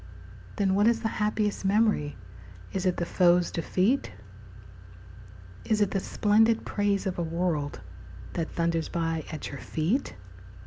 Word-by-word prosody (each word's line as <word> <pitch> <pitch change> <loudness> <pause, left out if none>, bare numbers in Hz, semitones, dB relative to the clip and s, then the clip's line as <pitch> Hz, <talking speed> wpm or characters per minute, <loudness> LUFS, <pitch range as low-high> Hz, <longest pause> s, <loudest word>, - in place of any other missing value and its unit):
Then 195 -2 +1
what 205 +3 +4
is 230 0 +2
the 225 - 0
happiest 210 -1 0
memory? 200 -7 +2 0.6
Is 190 0 -1
it 180 - +1
the 170 - -1
foe's 175 0 +3
defeat? 190 - 0 1.5
Is 215 - +1
it 205 -2 +2
the 195 - 0
splendid 220 +4 +2
praise 205 -1 0
of 185 -2 -2
a - - 0
world 165 -3 -2 0.5
That 165 -2 -2
thunders 165 -1 -1
by 165 -2 -2
at 155 - -6
your 140 - -7
feet? 185 - -1
185 Hz, 140 wpm, -27 LUFS, 165-210 Hz, 1.5 s, what